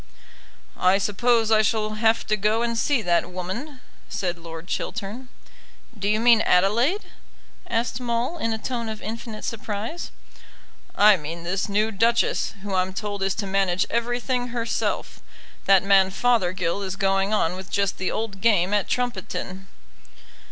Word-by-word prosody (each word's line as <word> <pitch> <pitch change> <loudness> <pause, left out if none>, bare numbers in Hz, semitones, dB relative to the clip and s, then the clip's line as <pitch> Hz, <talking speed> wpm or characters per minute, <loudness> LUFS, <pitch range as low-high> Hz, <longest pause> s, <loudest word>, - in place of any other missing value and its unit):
"I 185 +1 +4
suppose 225 +3 +2
I 215 -1 +6
shall 215 0 0
have 225 +1 +2
to 215 - +1
go 215 +3 +1
and 235 0 -1
see 245 +1 +1
that 175 -1 +1
woman," 225 - -6 0.3
said 185 -4 -2
Lord 165 0 -9
Chiltern. 220 +6 -5 0.7
"Do 205 -1 -2
you 215 +1 +2
mean 230 -1 +6
Adelaide?" 230 - +2 0.6
asked 230 +1 -1
Maule, 245 +7 -1
in 230 - -1
a 220 - -1
tone 235 0 -3
of 220 -1 -5
infinite 220 0 -6
surprise. 225 +8 -4 0.9
"I 210 -1 +6
mean 165 +2 -7
this 185 +4 -2
new 210 +2 +1
Duchess, 230 +2 +1
who 205 -1 -4
I'm 185 0 0
told 205 0 -4
is 195 -1 0
to 210 - -3
manage 190 -2 +1
everything 245 +1 -1
herself. 235 -1 -2 0.4
That 195 -1 +5
man 195 -1 +5
Fothergill 190 -5 +1
is 190 -1 -3
going 195 0 +1
on 180 -5 +1
with 190 +1 -9
just 200 -2 0
the 185 - 0
old 210 -3 -4
game 205 -4 +3
at 205 -2 +1
Trumpeton." 195 -5 -3
210 Hz, 150 wpm, -24 LUFS, 190-230 Hz, 0.9 s, I